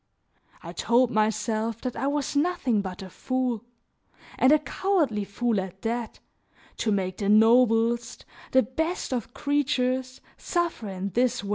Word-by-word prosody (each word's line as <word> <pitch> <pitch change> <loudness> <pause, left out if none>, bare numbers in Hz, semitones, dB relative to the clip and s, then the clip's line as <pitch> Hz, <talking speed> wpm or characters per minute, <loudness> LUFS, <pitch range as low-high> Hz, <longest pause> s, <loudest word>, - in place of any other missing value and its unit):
I - - -8
told 240 +1 +2
myself 215 +1 0
that 255 -2 -4
I 270 - -2
was 290 0 -1
nothing 285 - +1
but 185 -1 -7
a 190 - -9
fool, 255 -4 -2 0.8
and 260 - +5
a 305 - +7
cowardly 300 - 0
fool 225 +1 0
at 190 0 -9
that, 230 0 -3 0.6
to 220 - 0
make 185 -2 -1
the 200 -1 -1
noblest, 230 +1 +3 0.3
the 260 - +5
best 320 - -2
of 245 +1 -4
creatures, 260 -3 0 0.2
suffer 340 - -2
in 190 +1 -4
this 245 0 +1
way. 200 - -6
240 Hz, 145 wpm, -26 LUFS, 215-260 Hz, 0.8 s, a